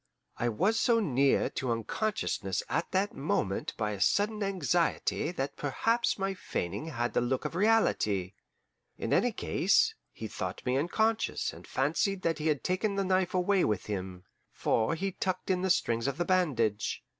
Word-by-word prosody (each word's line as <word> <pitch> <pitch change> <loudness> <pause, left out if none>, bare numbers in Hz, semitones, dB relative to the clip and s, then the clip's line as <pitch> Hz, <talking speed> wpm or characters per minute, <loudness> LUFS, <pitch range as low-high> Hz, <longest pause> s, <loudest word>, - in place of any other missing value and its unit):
I 120 - 0
was 200 - +1
so 235 -1 +3
near 140 - +2
to 130 -2 -2
unconsciousness 115 - -1
at 170 - -1
that 195 +2 0
moment 105 -8 -1
by 105 -2 -1
a 100 -2 -5
sudden 210 - +2
anxiety 175 -4 0
that 135 -4 -3
perhaps 230 - 0
my 195 0 -1
feigning 105 - -4
had 120 -6 -2
the - - +2
look 125 +2 -1
of - - -3
reality. 165 - +2 0.6
In - - -2
any - - +3
case, - - +2 0.2
he - - -7
thought - - -5
me 125 - +1
unconscious 220 +10 0
and - - -13
fancied 170 +8 0
that 165 -2 0
he 155 - -1
had 150 -3 +1
taken 195 +3 0
the 195 -1 0
knife 185 -1 +1
away 185 +1 +3
with 105 -3 0
him; 95 -3 -5 0.3
for 110 +8 +1
he 195 +4 -2
tucked 190 0 -2
in 180 -1 +1
the 190 - 0
strings 115 -7 +1
of 140 0 -2
the 175 - 0
bandage. 125 - +1
165 Hz, 170 wpm, -30 LUFS, 120-195 Hz, 0.6 s, so